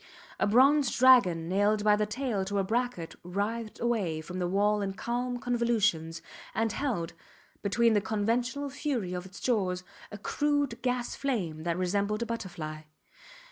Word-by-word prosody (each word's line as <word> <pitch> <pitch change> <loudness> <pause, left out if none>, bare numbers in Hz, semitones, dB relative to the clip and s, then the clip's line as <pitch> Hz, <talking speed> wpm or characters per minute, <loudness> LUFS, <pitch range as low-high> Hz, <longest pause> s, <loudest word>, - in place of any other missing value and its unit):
A - - +2
bronze 270 +5 +5
dragon 200 -11 +6
nailed 205 +3 +2
by 210 0 +5
the 210 0 0
tail 230 -3 -2
to 200 +1 -2
a 195 - +2
bracket 225 -5 -2
writhed 210 +5 -3
away 210 -10 0
from 180 +3 -6
the 180 - 0
wall 205 +3 +2
in 195 -1 -2
calm 245 +4 -2
convolutions, 220 -10 0 0.3
and 225 +1 +1
held, 205 - -2 0.5
between 230 +3 +3
the 205 - +3
conventional 240 +7 -1
fury 260 - -2
of 180 +1 -5
its 190 - -12
jaws, 185 -7 0 0.3
a 205 - -6
crude 285 +2 0
gas 250 -1 -1
flame 190 - -2
that 170 0 0
resembled 200 +4 0
a - - -4
butterfly. 170 -9 -5
210 Hz, 155 wpm, -29 LUFS, 185-245 Hz, 0.5 s, dragon